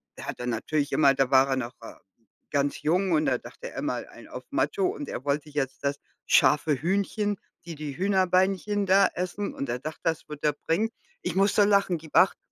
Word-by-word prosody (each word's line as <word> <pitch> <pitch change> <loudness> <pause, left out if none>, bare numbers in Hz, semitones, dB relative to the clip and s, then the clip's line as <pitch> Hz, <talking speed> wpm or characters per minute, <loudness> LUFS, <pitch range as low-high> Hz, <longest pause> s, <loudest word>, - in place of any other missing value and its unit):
er - - -9
hat - - -5
dann 125 - -2
natürlich 140 +5 -1
immer, 140 -3 +5
da 135 -1 0
war 135 0 +6
er 135 - +2
noch, 125 -1 -4
äh, 115 - -9 0.6
ganz 140 -1 0
jung 180 +4 +1
und 155 -1 +2
da - - +2
dachte - - -10
er, - - -5
„mal - - -3
einen - - -14
auf - - -8
Macho“, 400 -3 0
und 305 -6 -4
er - - -5
wollte 145 +1 -1
jetzt 145 -3 -3
das 140 0 0 0.3
scharfe 150 0 +4
Hühnchen, 200 +3 0 0.3
die 170 - -6
die 145 -2 -6
Hühnerbeinchen 190 +2 +2
da 195 +1 +5
essen 185 +3 -3
und 140 - -4
er 120 +1 -2
dachte, 155 +4 -7
das 165 -2 -1
wird 150 -1 -8
er 150 -1 +3
bringen. 210 +8 +2 0.3
Ich - - -2
muss 195 +1 +3
so 205 - +6
lachen, 200 -3 +3
gibt 160 -1 -13
acht, 190 - +5
160 Hz, 215 wpm, -27 LUFS, 140-195 Hz, 0.6 s, war